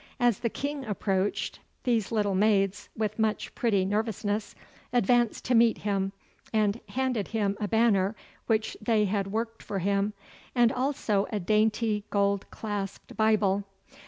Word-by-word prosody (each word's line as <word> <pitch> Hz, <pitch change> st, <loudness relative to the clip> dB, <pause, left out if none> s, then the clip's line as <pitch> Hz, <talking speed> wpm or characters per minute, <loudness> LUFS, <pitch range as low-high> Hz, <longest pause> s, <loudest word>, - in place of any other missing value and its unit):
As 240 Hz, -4 st, +3 dB
the 235 Hz, -, 0 dB
King 285 Hz, +3 st, -4 dB
approached, 200 Hz, -3 st, -1 dB, 0.2 s
these 230 Hz, -5 st, +1 dB
little 205 Hz, -3 st, +1 dB
maids, 195 Hz, 0 st, +2 dB
with 215 Hz, 0 st, -2 dB
much 220 Hz, -1 st, 0 dB
pretty 200 Hz, -6 st, +1 dB
nervousness, 210 Hz, 0 st, -1 dB, 0.4 s
advanced 240 Hz, 0 st, +2 dB
to 250 Hz, -, +1 dB
meet 230 Hz, -1 st, +5 dB
him, 195 Hz, -2 st, -1 dB, 0.4 s
and 215 Hz, 0 st, +2 dB
handed 250 Hz, -5 st, -1 dB
him 205 Hz, -3 st, 0 dB
a 210 Hz, -, -1 dB
banner 220 Hz, -2 st, +3 dB, 0.3 s
which 220 Hz, -1 st, +1 dB
they 215 Hz, -1 st, +2 dB
had 200 Hz, 0 st, 0 dB
worked 225 Hz, +3 st, -3 dB
for 200 Hz, -, -4 dB
him, 200 Hz, +2 st, +1 dB, 0.4 s
and 240 Hz, -2 st, +5 dB
also 250 Hz, -6 st, 0 dB
a 210 Hz, -, -1 dB
dainty 215 Hz, +2 st, +1 dB
gold 200 Hz, -1 st, +1 dB
clasped 205 Hz, -3 st, -5 dB
Bible. 210 Hz, -2 st, +3 dB
215 Hz, 140 wpm, -28 LUFS, 200-230 Hz, 0.4 s, meet